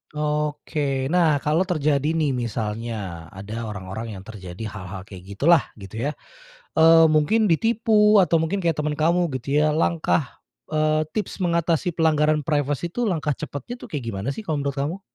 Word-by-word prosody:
Oke, 150 Hz, -2 st, -1 dB
nah 160 Hz, -3 st, +3 dB
kalau 155 Hz, +6 st, +1 dB
terjadi 150 Hz, -5 st, +1 dB
nih 155 Hz, -5 st, 0 dB
misalnya 115 Hz, -1 st, -3 dB, 0.4 s
ada 105 Hz, +4 st, -6 dB
orang-orang 105 Hz, +1 st, -6 dB
yang 95 Hz, -, -12 dB
terjadi 95 Hz, -4 st, -9 dB
hal-hal 95 Hz, -2 st, -7 dB
kayak 95 Hz, -2 st, -11 dB
gitulah 160 Hz, -, +4 dB, 0.2 s
gitu 95 Hz, +2 st, -10 dB
ya, 145 Hz, -, 0 dB, 0.6 s
eee, 165 Hz, 0 st, +7 dB
mungkin 155 Hz, +9 st, +3 dB
ditipu 215 Hz, +2 st, +3 dB
atau 170 Hz, -4 st, +4 dB
mungkin 165 Hz, +5 st, -1 dB
kayak 165 Hz, -, +3 dB
teman 150 Hz, 0 st, -1 dB
kamu 170 Hz, +3 st, +2 dB
gitu 140 Hz, +4 st, 0 dB
ya, 150 Hz, 0 st, +2 dB
langkah, 160 Hz, -3 st, 0 dB, 0.3 s
eee, 155 Hz, 0 st, +2 dB
tips 215 Hz, -, -3 dB
mengatasi 170 Hz, 0 st, +1 dB
pelanggaran 155 Hz, -2 st, +2 dB
privacy 145 Hz, +1 st, -1 dB
itu, 240 Hz, +8 st, -2 dB
langkah 155 Hz, -8 st, -1 dB
cepatnya 145 Hz, -, -6 dB
tuh -, -, -12 dB
kayak 140 Hz, -5 st, -3 dB
gimana 100 Hz, +1 st, -4 dB
sih 220 Hz, -, -7 dB
kalau 160 Hz, -8 st, -2 dB
menurut 140 Hz, 0 st, -2 dB
kamu? 165 Hz, +8 st, -3 dB
150 Hz, 160 wpm, -23 LUFS, 130-165 Hz, 0.6 s, eee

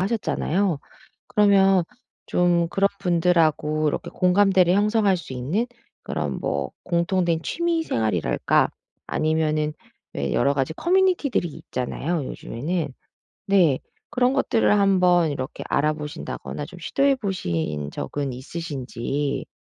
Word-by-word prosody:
하셨잖아요. 190 Hz, -4 st, 0 dB, 0.5 s
그러면 195 Hz, -2 st, +4 dB, 0.4 s
좀 175 Hz, -1 st, +2 dB
그런 195 Hz, +3 st, +2 dB
분들하고 165 Hz, -4 st, +2 dB
이렇게 -, -, -3 dB
공감대를 185 Hz, -1 st, +4 dB
형성할 205 Hz, 0 st, +3 dB
수 170 Hz, -6 st, -8 dB
있는 145 Hz, -, -1 dB, 0.4 s
그런 -, -, -3 dB
뭐 -, -, -2 dB
공통된 170 Hz, -1 st, +1 dB
취미생활이랄까 320 Hz, -, +1 dB, 0.4 s
아니면은 155 Hz, -1 st, 0 dB, 0.4 s
왜 70 Hz, -1 st, -2 dB
여러 140 Hz, 0 st, +2 dB
가지 135 Hz, +2 st, -1 dB
커뮤니티들이 350 Hz, -, +2 dB
있잖아요, 145 Hz, +3 st, -3 dB
요즘에는. 150 Hz, +3 st, -4 dB, 0.5 s
네. 175 Hz, -9 st, +4 dB, 0.3 s
그런 250 Hz, +1 st, +2 dB
것들을 225 Hz, -6 st, +2 dB
한번 180 Hz, -5 st, +4 dB
이렇게 130 Hz, 0 st, -5 dB
알아보신다거나 150 Hz, -1 st, -2 dB
좀 180 Hz, +1 st, -12 dB
시도해 275 Hz, -, +2 dB
보신 85 Hz, -, -3 dB
적은 140 Hz, -2 st, -3 dB
있으신지 140 Hz, -1 st, -4 dB
170 Hz, 290 characters per minute, -24 LUFS, 145-195 Hz, 0.5 s, 그러면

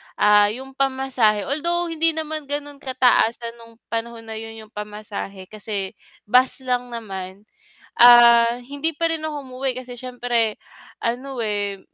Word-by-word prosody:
ah, 210 Hz, 0 st, +5 dB
yung 260 Hz, +5 st, -6 dB
pamasahe 265 Hz, -6 st, +1 dB
although 340 Hz, -, -1 dB
hindi 325 Hz, 0 st, +2 dB
naman 310 Hz, -2 st, -4 dB
ganon 290 Hz, 0 st, -4 dB
kataasan 240 Hz, -3 st, +1 dB
nung 230 Hz, 0 st, -15 dB, 0.2 s
panahon 230 Hz, 0 st, -4 dB
na 220 Hz, -1 st, -6 dB
yun 225 Hz, 0 st, -7 dB
yung 215 Hz, -, -18 dB
pamasahe, 210 Hz, -2 st, -7 dB
kasi 205 Hz, -2 st, -4 dB, 0.3 s
bus 255 Hz, +4 st, +3 dB
lang 250 Hz, -1 st, -1 dB
naman, 195 Hz, -5 st, -7 dB, 0.5 s
ah, 235 Hz, 0 st, +7 dB
hindi 285 Hz, +5 st, -3 dB
pa 330 Hz, +2 st, 0 dB
rin 325 Hz, -1 st, -3 dB
ako 300 Hz, -2 st, -3 dB
umuwi 255 Hz, +1 st, -2 dB
kasi, 250 Hz, -1 st, -10 dB
siyempre 240 Hz, -3 st, -1 dB, 0.4 s
ano, 250 Hz, +2 st, -3 dB
eh, 205 Hz, -3 st, -2 dB
240 Hz, 140 wpm, -22 LUFS, 220-270 Hz, 0.5 s, ah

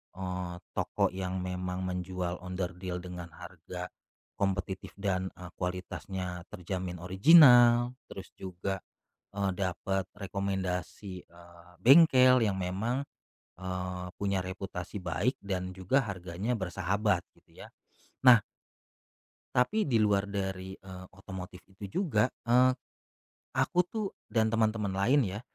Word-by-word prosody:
eee, 90 Hz, -1 st, -4 dB, 0.2 s
toko -, -, +1 dB
yang 95 Hz, 0 st, -3 dB
memang 90 Hz, 0 st, -3 dB
menjual 90 Hz, -1 st, -3 dB
onderdil 90 Hz, 0 st, -4 dB
dengan 90 Hz, -1 st, -7 dB
harga 90 Hz, 0 st, -8 dB, 0.5 s
kompetitif 95 Hz, -1 st, -2 dB
dan 95 Hz, -2 st, 0 dB
e 90 Hz, -, -10 dB, 0.2 s
kualitasnya 90 Hz, 0 st, -4 dB
terjamin 90 Hz, 0 st, -4 dB
original 120 Hz, -, +7 dB, 0.2 s
terus 95 Hz, -1 st, -9 dB
juga, 95 Hz, +1 st, -4 dB, 0.6 s
eee, 100 Hz, -1 st, 0 dB
dapat 95 Hz, 0 st, -1 dB
rekomendasi, 95 Hz, -1 st, -3 dB
eee, 85 Hz, 0 st, -17 dB
bengkel 130 Hz, -3 st, +7 dB
yang 100 Hz, -3 st, 0 dB
memang, 110 Hz, +10 st, -2 dB, 0.5 s
eee, 90 Hz, 0 st, -4 dB
punya 100 Hz, -2 st, 0 dB
reputasi 95 Hz, 0 st, -6 dB
baik 90 Hz, +8 st, 0 dB
dan 95 Hz, -2 st, -3 dB
juga 95 Hz, +9 st, +2 dB
harganya 95 Hz, +4 st, -3 dB
bersahabat, 95 Hz, +1 st, 0 dB, 0.2 s
gitu, -, -, -17 dB
ya. -, -, -14 dB, 0.5 s
Nah. 125 Hz, -3 st, +9 dB, 1.1 s
tapi 205 Hz, -, +3 dB
di 130 Hz, -, +2 dB
luar 100 Hz, -2 st, +2 dB
dari, 95 Hz, -1 st, -4 dB
eee, 95 Hz, -1 st, -10 dB
otomotif 95 Hz, -1 st, -9 dB
itu 95 Hz, +1 st, -12 dB, 0.2 s
juga, 125 Hz, -, +2 dB, 0.2 s
eee, 125 Hz, +2 st, +6 dB, 0.8 s
aku -, -, 0 dB
tuh 210 Hz, +4 st, -4 dB, 0.2 s
dan 110 Hz, 0 st, +3 dB
teman-teman 110 Hz, -2 st, +1 dB
lain 120 Hz, +10 st, +3 dB
ya, 95 Hz, +3 st, -4 dB
95 Hz, 115 wpm, -30 LUFS, 90-105 Hz, 1.1 s, Nah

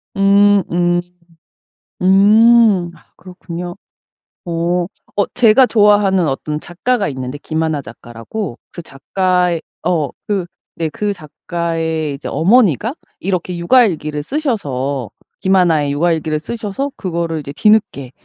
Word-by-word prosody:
음음. 195 Hz, -3 st, +3 dB, 1.0 s
음 205 Hz, 0 st, +5 dB
아 -, -, -22 dB
그렇군요. 175 Hz, -1 st, -8 dB, 0.7 s
어 175 Hz, +1 st, -1 dB, 0.3 s
어 205 Hz, -, +2 dB
제가 245 Hz, +2 st, +5 dB
좋아하는 205 Hz, -5 st, +3 dB
어떤 150 Hz, +2 st, -3 dB
작가가 200 Hz, +7 st, -1 dB
있는데 130 Hz, 0 st, -5 dB
김하나 160 Hz, -1 st, -2 dB
작가라고. 120 Hz, -, -7 dB
그 175 Hz, -, -8 dB
작가의 180 Hz, +3 st, -1 dB, 0.2 s
어 165 Hz, -5 st, +1 dB, 0.2 s
그 200 Hz, -4 st, -1 dB, 0.3 s
네 165 Hz, -1 st, -2 dB
그 205 Hz, +6 st, -2 dB
작가의 160 Hz, -2 st, -3 dB
이제 140 Hz, -, -8 dB
어머니가 210 Hz, -, +2 dB, 0.2 s
이렇게 180 Hz, -1 st, -2 dB
육아일기를 170 Hz, -, +2 dB
쓰셔서 145 Hz, -, -2 dB, 0.3 s
김하나의 175 Hz, -6 st, +2 dB
육아일기를 155 Hz, 0 st, 0 dB
쓰셔서 225 Hz, -, -4 dB
그거를 170 Hz, -4 st, -3 dB
이제 140 Hz, 0 st, -8 dB
뒤늦게 205 Hz, -, +2 dB
175 Hz, 260 characters per minute, -17 LUFS, 155-205 Hz, 1.0 s, 음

